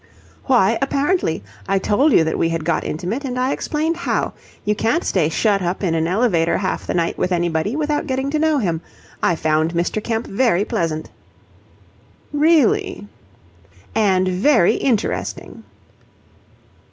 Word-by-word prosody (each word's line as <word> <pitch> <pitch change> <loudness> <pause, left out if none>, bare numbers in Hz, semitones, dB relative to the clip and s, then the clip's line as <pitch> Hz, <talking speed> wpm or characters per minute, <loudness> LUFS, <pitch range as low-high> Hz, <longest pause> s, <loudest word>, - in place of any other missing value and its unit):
"Why 230 -4 +3
'apparently'? 275 - 0 0.3
I 195 - +3
told 235 +10 +2
you 165 - +5
that 160 - -2
we 165 - +2
had 165 -2 -3
got 170 -2 0
intimate, 185 - -3
and 250 -2 -4
I 255 +2 +1
explained 315 +4 -1
how. 345 - -1 0.3
You 210 - +2
can't 230 - 0
stay 165 -5 +1
shut 200 +3 +1
up 180 +3 -2
in 175 -4 +1
an 160 0 0
elevator 180 -4 +2
half 190 0 -3
the - - -2
night 170 -1 -1
with 180 - 0
anybody 175 - 0
without 300 -1 -1
getting 265 +1 -1
to 305 - 0
know 315 -1 +2
him. 170 - -1 0.4
I 175 - +2
found 155 +1 0
Mr. 175 +5 -1
Kemp 225 0 -2
very 205 -3 +1
pleasant." 155 -5 -2 1.2
"Really?" 335 - +2 0.9
"And 190 -4 +2
very 200 +2 +3
interesting." 230 -4 -2
205 Hz, 150 wpm, -20 LUFS, 170-275 Hz, 1.2 s, you